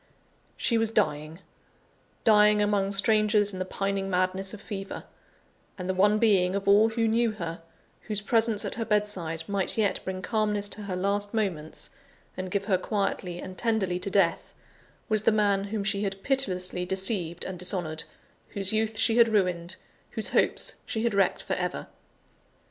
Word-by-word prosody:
She 230 -2 +1
was 225 -1 +2
dying: 160 -5 -1 0.8
dying 210 -1 +5
among 205 -1 +1
strangers 210 0 +3
in 185 - -6
the 185 - -2
pining 195 +1 -2
madness 185 +1 0
of 215 - -8
fever 195 -2 -6 0.7
and 180 -2 -5
the 190 - 0
one 205 +3 +3
being 195 -4 +3
of 200 0 -3
all 210 +3 +6
who 225 0 0
knew 230 0 +2
her, 170 -5 -6 0.5
whose 210 -2 0
presence 225 0 +1
at - - -3
her 225 - -2
bedside 205 -7 -1
might 200 0 -1
yet 210 -3 +1
bring 185 0 -5
calmness 210 -2 0
to 210 - -2
her 190 -2 -3
last 205 +3 -1
moments, 175 -8 -2 0.4
and 185 0 -5
give 200 +1 -1
her 190 -3 +2
quietly 185 -3 -2
and 185 0 -8
tenderly 205 -6 0
to 185 - -3
death, 190 -4 +1 0.5
was 215 -2 +2
the 220 - +3
man 205 -2 +2
whom 205 0 -3
she 200 0 0
had 195 -1 -4
pitilessly 185 -10 0
deceived 185 -2 0
and 185 -2 -6
dishonoured, 175 -4 -3 0.5
whose 195 0 0
youth 220 0 0
she 225 +2 +3
had 230 -1 +6
ruined, 180 -4 0 0.4
whose - - -1
hopes - - +1
she 220 - -3
had 235 -2 +1
wrecked 195 -1 +1
for - - -2
ever. - - -3
200 Hz, 170 wpm, -27 LUFS, 185-215 Hz, 0.8 s, all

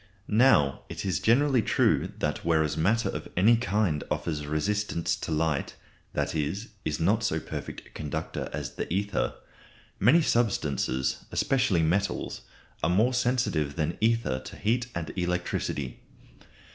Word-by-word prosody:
Now, 105 - +4
it - - -5
is 95 - 0
generally 130 +2 +4
true - - +2
that 75 -1 -2
whereas 80 -3 +2
matter 105 +9 +2
of - - -5
any 110 +6 +6
kind 100 -8 0
offers 75 -3 -2
resistance 85 +3 0
to - - -5
light 80 -2 0 0.4
that - - -1
is, 80 +8 -2
is 75 - -2
not 100 +7 +2
so 80 -6 +1
perfect - - -7
a - - -18
conductor 75 -3 -4
as - - -4
the - - -4
ether 95 -10 0 0.6
many 170 0 +5
substances, 75 - 0
especially 125 -11 +2
metals, 95 +6 0 0.4
are 80 - +2
more 110 +8 +3
sensitive 120 - 0
than 80 +2 -2
ether 115 - +2
to 65 - -10
heat 120 +3 0
and 85 -2 -4
electricity. 90 -7 -2
90 Hz, 140 wpm, -28 LUFS, 75-115 Hz, 0.6 s, any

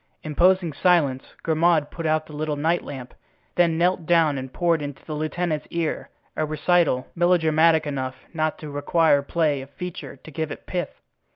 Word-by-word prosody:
Imposing 175 +2 +2
silence, 145 -6 +1
Grimaud 160 -1 +2
put 165 -2 -4
out 155 0 +1
the 150 - -13
little 150 0 -2
night 160 +4 0
lamp, 130 -3 -8 0.4
then 170 -2 +2
knelt 175 -1 +1
down 165 -4 +4
and 130 -1 -5
poured 170 -1 +1
into 145 -2 -7
the 155 - -5
lieutenant's 155 +1 -2
ear 170 -2 -2 0.3
a - - 0
recital 155 -3 +1
melodramatic 165 -2 +3
enough 130 -3 -3 0.2
not 155 -1 -1
to 150 -2 -8
require 145 +1 +3
play 145 -1 0
of 135 - -11
feature 160 -3 -7
to 150 +4 -14
give 160 +1 -3
it - - -8
pith. 180 -1 -4
155 Hz, 170 wpm, -24 LUFS, 145-170 Hz, 0.4 s, down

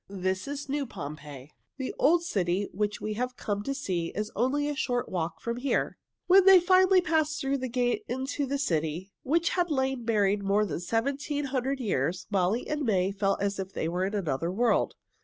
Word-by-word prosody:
"This 185 +1 -2
is 285 0 -5
new 280 0 -2
Pompeii. 145 - -8 0.3
The 265 -2 -4
old 335 +4 +4
city 195 - 0
which 210 +1 -1
we 215 - -3
have 250 +3 -3
come 205 -2 -2
to 275 +6 -3
see 180 - -2
is 210 +1 -3
only 270 +6 +1
a 295 - -2
short 245 -3 -1
walk 165 -2 -3
from 235 0 -3
here." 265 +2 -1 0.3
When 375 +1 +7
they 385 -1 +9
finally 370 +1 +5
passed 315 -2 +1
through 275 0 -1
the 255 0 -3
gate 245 0 0
into 265 +3 -2
the 280 +2 -1
city, 170 - -1
which 330 +5 +1
had 355 -1 0
lain 265 -3 0
buried 205 -3 +2
more 200 +2 +2
than 190 - -3
seventeen 275 - -1
hundred 265 0 -1
years, 180 - -1
Molly 195 +4 +1
and 300 0 -2
May 195 -5 +2
felt 195 0 0
as 200 0 -1
if 190 0 -5
they - - -2
were 180 +3 -1
in 200 +2 -3
another 165 -3 -1
world. 235 +6 +1
235 Hz, 195 wpm, -28 LUFS, 190-280 Hz, 0.3 s, they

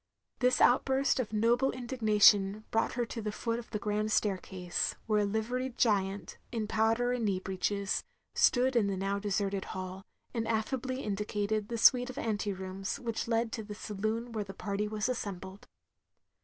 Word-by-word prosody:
This 250 0 +3
outburst 265 +2 +3
of 235 -5 -2
noble 235 +5 +3
indignation 215 -4 +3
brought 225 - +1
her 240 -1 0
to 230 0 -6
the 210 0 -2
foot 230 +2 -2
of 235 - -10
the 215 - -2
grand 210 0 -1
staircase; 185 -4 -1
where 215 -1 +2
a 205 - +2
liveried 240 +5 -2
giant, 195 -4 0
in 225 -3 -2
powder 225 +3 +2
and 245 -2 -1
knee 195 -3 +1
breeches, 190 +1 -1 0.3
stood 255 +1 +3
in 220 -4 +3
the 195 -1 -1
now 195 +1 -1
deserted 200 -1 -1
hall, 185 +1 -6 0.3
and 225 -2 -2
affably 255 +4 -1
indicated 210 +1 -1
the 235 - -3
suite 250 +2 +5
of 255 - -8
ante 210 -5 -1
rooms 190 0 -4
which 230 -2 -3
led 230 0 +1
to 220 - -4
the 210 0 -8
saloon 215 +4 -3
where 215 -2 -2
the 195 -1 -10
party 205 +1 -2
was 210 +1 -1
assembled. 195 -5 -5
215 Hz, 170 wpm, -31 LUFS, 200-235 Hz, 0.3 s, suite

